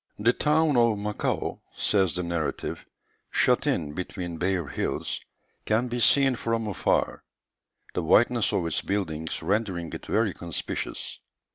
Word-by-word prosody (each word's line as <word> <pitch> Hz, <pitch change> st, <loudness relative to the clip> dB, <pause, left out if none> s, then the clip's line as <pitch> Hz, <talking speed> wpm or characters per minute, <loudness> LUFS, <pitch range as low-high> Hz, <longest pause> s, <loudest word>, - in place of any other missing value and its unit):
"The 115 Hz, +4 st, +3 dB
town 150 Hz, -1 st, +3 dB
of 115 Hz, -3 st, +4 dB
Macao," 105 Hz, 0 st, -2 dB
says 95 Hz, -5 st, +2 dB
the 90 Hz, -, -1 dB
narrative, 85 Hz, -3 st, -3 dB, 0.5 s
"shut -, -, +2 dB
in 75 Hz, -3 st, 0 dB
between 90 Hz, -1 st, -5 dB
bare 90 Hz, -2 st, +1 dB
hills, -, -, -2 dB, 0.4 s
can 115 Hz, +3 st, +1 dB
be 120 Hz, +1 st, -2 dB
seen 135 Hz, +2 st, +5 dB
from 115 Hz, -1 st, -1 dB
afar; 100 Hz, -, 0 dB, 0.7 s
the -, -, 0 dB
whiteness -, -, +4 dB
of -, -, 0 dB
its 85 Hz, -, 0 dB
buildings 80 Hz, -6 st, -2 dB
rendering 95 Hz, -5 st, -1 dB
it -, -, -7 dB
very 110 Hz, -3 st, +2 dB
conspicuous. 85 Hz, -2 st, -4 dB
100 Hz, 135 wpm, -27 LUFS, 85-115 Hz, 0.7 s, seen